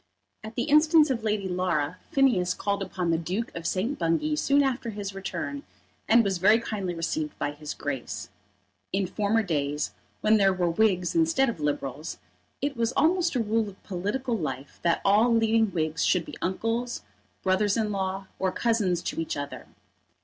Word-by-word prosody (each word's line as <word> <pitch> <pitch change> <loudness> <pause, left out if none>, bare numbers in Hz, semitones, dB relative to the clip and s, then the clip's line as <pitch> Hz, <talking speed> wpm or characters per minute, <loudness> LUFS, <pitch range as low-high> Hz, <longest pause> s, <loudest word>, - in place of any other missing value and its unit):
At 220 +1 -8
the 240 - 0
instance 305 0 +5
of 240 -3 -1
Lady 210 -3 0
Laura, 180 -3 -1
Phineas 240 -10 +3
called 200 -1 -1
upon 180 -3 -2
the 165 - +2
Duke 185 +7 -3
of 165 0 -4
St. 220 +12 -1
Bungay 170 - +1
soon 285 -1 +3
after 260 -3 -1
his 200 -2 -5
return, 195 +9 -4 0.5
and 230 +1 +6
was 195 -3 -1
very 210 +5 +5
kindly 195 -6 -3
received 155 -2 -3
by 145 - -1
his 150 0 -7
Grace. 135 -4 -4 0.6
In 195 0 +1
former 210 +4 +1
days, 150 -4 -1 0.3
when 215 +1 +5
there 195 -2 +4
were 175 -2 +1
Whigs 185 -2 +2
instead 320 -5 +3
of 225 - -5
Liberals, 145 0 -3 0.5
it 285 -1 0
was 235 0 0
almost 340 0 +2
a 240 - +2
rule 220 0 0
of 195 - -16
political 210 +7 -2
life 145 - -5
that 170 -1 +1
all 210 +5 +5
leading 225 -1 +3
Whigs 160 -4 -1
should 180 -3 +2
be - - -10
uncles, 230 +6 -2 0.4
brothers 195 +2 +2
in 215 -2 0
law, 195 -1 -2
or 190 -1 +1
cousins 210 -6 +1
to - - -2
each 160 - -3
other. 145 0 -6
200 Hz, 175 wpm, -27 LUFS, 175-230 Hz, 0.6 s, and